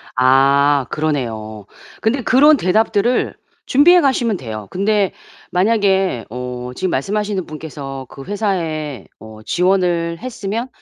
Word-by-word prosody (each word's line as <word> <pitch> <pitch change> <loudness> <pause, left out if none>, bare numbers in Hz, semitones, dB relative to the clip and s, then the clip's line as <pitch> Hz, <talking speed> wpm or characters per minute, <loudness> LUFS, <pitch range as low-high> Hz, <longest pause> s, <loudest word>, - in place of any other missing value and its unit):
아 135 +2 +4
그러네요. 115 -9 -3 0.4
근데 245 +4 +1
그런 290 +3 +5
대답들을 220 +4 +1 0.3
준비해 345 +6 +5
가시면 240 -7 +1
돼요. 110 - -7
근데 200 +1 +1 0.4
만약에 190 - +1
어 125 +1 -6
지금 185 - -2
말씀하시는 200 +5 -2
분께서 145 -4 -7
그 135 - -10
회사에 165 - -3
어 110 0 -12
지원을 175 - +1
했으면 230 -1 -4
175 Hz, 265 characters per minute, -18 LUFS, 135-210 Hz, 0.4 s, 그런